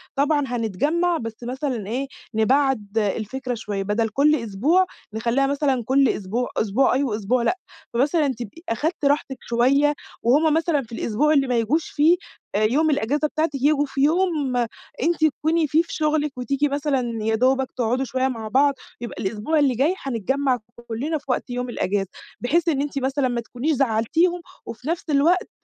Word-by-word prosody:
طبعًا 290 +1 +2
هنتجمع 290 - 0
بس 225 -3 -5
مثلًا 250 -4 -3
إيه 260 +5 -2 0.3
نبعد 225 -3 +1
الفكرة 225 +5 -1
شوية 210 -4 -3
بدل 220 +3 0
كل 290 +7 +3
أسبوع 265 - +2 0.3
نخلّيها 235 +5 +1
مثلًا 275 -4 0
كل 270 +1 +4
أسبوع، 215 +5 -2
أسبوع 235 +5 +2
آه 265 -5 0
أسبوع 235 +4 0
لأ، 365 +9 +1 0.4
فمثلًا 290 +5 +2
تبقي 245 +4 -6
أخدتِ 295 +6 -1
راحتِك 280 -2 +1
شوية 275 +5 +3 0.3
وهُم 295 +6 +4
مثلًا 320 -2 +1
في 235 - -14
الأسبوع 235 +7 +1
اللي 275 -3 +3
ما 250 - 0
ييجوش 290 +8 0
فيه 320 +4 +4 0.4
يوم 260 +9 +2
الإجازة 290 +2 +1
بتاعتِك 310 -1 -1
ييجيوا 290 +2 +2
في 270 0 -3
يوم 310 -4 +2 0.5
أنتِ 330 -1 +2
تكوني 315 +2 +1
في 315 +4 +3
في 335 - -9
شغلِك 300 -3 0
وتيجي 275 +3 0
مثلًا 265 -6 -1
يا 220 0 +1
دوبك 260 +2 +2
تقعدوا 250 +2 0
شوية 260 +1 0
مع 225 -4 -4
بعض، 280 +5 +3 0.3
يبقى 240 - -6
الأسبوع 220 +10 0
اللي 270 -4 +3
جاي 285 +9 +2
هنتجمع 265 +2 0 0.3
كلنا 280 +8 -2
في 290 - -14
وقت 255 0 -1
يوم 245 0 -3
الإجازة، 195 -4 -1 0.3
بحيث 330 +8 +1
إن 280 -4 +2
أنتِ 280 -1 -2
مثلًا 265 +1 0
ما 240 -1 -1
تكونيش 245 +7 -2
زعلتيهم، 275 +8 +1 0.2
وفي 230 +4 -8
نفس 335 +1 -1
الوقت 315 +6 +3
270 Hz, 165 wpm, -23 LUFS, 235-295 Hz, 0.5 s, كل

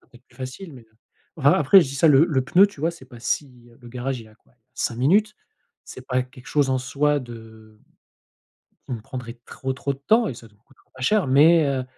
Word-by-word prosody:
serait - - -32
peut - - -17
être 125 - -40
plus 125 - -25
facile 135 +7 -8
mais, 125 -3 -13
heu, 110 - -35 0.4
enfin, 145 -2 +4
après, 150 +7 +6
je - - -4
dis 135 - -7
ça, 160 +4 +4
le 145 +1 +6
le 140 -7 0
pneu, 185 +8 +5
tu 200 -8 -14
vois? 165 +3 +1
C'est 170 -6 -14
pas 120 -2 -14
si 125 -2 -4
le 120 - -13
garage, 125 +1 -4
il - - -13
est - - -18
à - - -22
quoi? - - -33 0.2
5 120 -2 -3
minutes. 200 - +2 0.5
C'est 130 0 -12
pas 130 -1 0
quelque 125 0 -16
chose 145 -3 +1
en 130 - +1
soi 145 +3 0
de 110 -3 -13 1.1
qui - - -8
me 115 - -6
prendrait 120 0 -9
trop, 130 0 -5
trop 140 +1 -3
de 135 - -15
temps 220 - +2
et - - -4
ça 115 - -13
nous 105 -1 -27
coûtera 125 +5 -29
pas 130 - -12
cher 210 +2 +2
mais, 155 +5 +5
heu, 135 -2 -1
130 Hz, 250 wpm, -23 LUFS, 125-150 Hz, 1.1 s, après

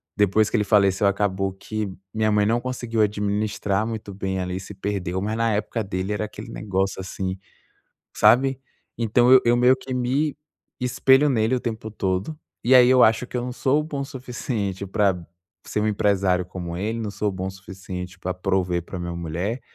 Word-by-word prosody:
depois 105 +1 +3
que - - -2
ele 105 - +3
faleceu, 100 -1 +3
acabou 95 -1 0
que 105 +1 -5 0.2
minha 110 0 +1
mãe 105 0 +3
não 115 +2 +1
conseguiu 120 -3 -2
administrar 105 0 0
muito 110 -3 -5
bem, 95 0 -3
ela 90 0 -3
se 100 - -9
perdeu, 95 -2 -3
mas 110 +2 -2
na 115 0 +1
época 105 +2 -1
dele 95 +1 -3
era 105 +1 -2
aquele 105 - -9
negócio 95 -2 -2
assim, 95 0 -4 0.8
sabe? 130 +5 +4 0.4
Então 120 +3 +5
eu 120 0 +4
meio 125 +2 +5
que 130 0 -7
me 135 +4 0 0.4
espelho 135 +3 +4
nele 115 0 +2
o - - -1
tempo 110 -2 -5
todo. 95 +9 -2 0.3
E 125 +3 +4
aí 125 -1 +8
eu 130 -1 +6
acho 115 +3 +3
que - - -9
eu - - -1
não 125 - -4
sou 140 +4 +1
bom 145 -3 -5
o 135 - -3
suficiente 120 -7 -4
pra 95 -3 +1 0.5
ser 105 - -2
um 110 - +1
empresário 100 -3 +2
como 90 -2 -6
ele, 110 +5 -2
não 105 -2 -3
sou 105 0 -1
bom 95 0 -4
o - - -4
suficiente 95 -1 -8
pra 90 0 -3
prover 90 -1 0
pra 90 - -7
minha 85 0 -4
mulher. 85 +8 -3
105 Hz, 190 wpm, -23 LUFS, 95-120 Hz, 0.8 s, aí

